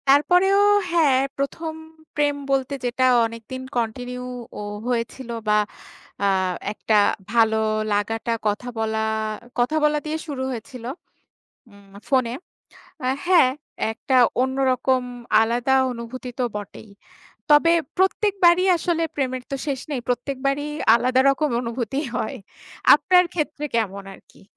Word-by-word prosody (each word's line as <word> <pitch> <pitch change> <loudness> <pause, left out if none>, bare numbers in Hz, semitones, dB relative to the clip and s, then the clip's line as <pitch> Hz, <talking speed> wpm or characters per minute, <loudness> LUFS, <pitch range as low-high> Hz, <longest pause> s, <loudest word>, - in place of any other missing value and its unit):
তারপরেও 360 +8 +4 0.3
হ্যাঁ, 310 -6 +4 0.2
প্রথম 315 +4 -3 0.4
প্রেম 290 -1 +1 0.2
বলতে 270 0 0
যেটা 255 +1 +1 0.2
অনেকদিন 230 +3 -7 0.2
কন্টিনিউও 245 0 -5 0.3
হয়েছিল 240 +1 -3 0.2
বা 210 0 +4 0.7
আ - - +3 0.5
একটা 215 0 0 0.4
ভালো 225 -1 +3 0.4
লাগাটা, 225 +3 -1 0.2
কথা 210 +4 -2
বলা 220 0 -1 0.6
কথা 245 +6 +1
বলা 300 0 +3
দিয়ে 310 +1 -2
শুরু 275 -3 -4
হয়েছিল। 240 0 -8 0.9
উম 200 -1 -19 0.2
ফোনে। 255 -4 +2 0.9
হ্যাঁ, 350 -8 +5 0.4
একটা 245 +4 -2 0.3
অন্যরকম 260 0 +1 0.4
আলাদা 240 +4 +1 0.2
অনুভূতি 245 +2 -7
তো - - +2
বটেই। 210 +1 -8 0.6
তবে 300 +3 +6 0.2
প্রত্যেকবারই 375 -2 +3
আসলে 335 0 -1
প্রেমের 260 -2 -2
তো 275 - -2
শেষ 275 -3 -2
নেই। 275 -4 -2
প্রত্যেকবারই 275 +3 -1 0.3
আলাদা 255 +2 +2
রকম 300 +2 0
অনুভূতি 235 +1 -3 0.2
হয়। 220 - -3 0.6
আপনার 365 -1 +4
ক্ষেত্রে 300 -2 -3
কেমন 200 -4 -1
আর - - -15
কি? - - -20
255 Hz, 115 wpm, -23 LUFS, 230-295 Hz, 0.9 s, তবে